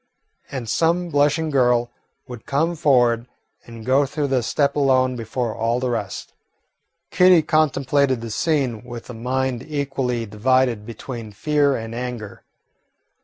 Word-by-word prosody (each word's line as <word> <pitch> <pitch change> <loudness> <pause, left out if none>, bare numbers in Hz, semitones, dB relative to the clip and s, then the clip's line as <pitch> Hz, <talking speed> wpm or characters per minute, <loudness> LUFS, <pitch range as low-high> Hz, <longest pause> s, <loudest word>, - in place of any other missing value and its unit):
And 130 -4 -5
some 170 +7 +1
blushing 150 +2 +1
girl 120 -3 +2 0.4
would 120 -3 -10
come 160 +5 0
forward 125 -6 +2 0.4
and 115 -1 -10
go 135 +2 +3
through 140 +1 -2
the 130 -2 +2
step 140 +5 0
alone 130 -3 +2
before 115 0 -3
all 115 +2 0
the 125 -1 -1
rest. 105 -5 -4 0.8
Kitty 180 -3 +5
contemplated 140 -4 +2
the 115 -1 -6
scene 135 -5 0
with 120 +1 -9
a - - -8
mind 125 +1 -2
equally 135 -5 -2
divided 115 +1 +1
between 115 -1 -7
fear 145 +5 +1
and 115 -1 -6
anger. 120 -3 -6
130 Hz, 135 wpm, -22 LUFS, 115-145 Hz, 0.8 s, Kitty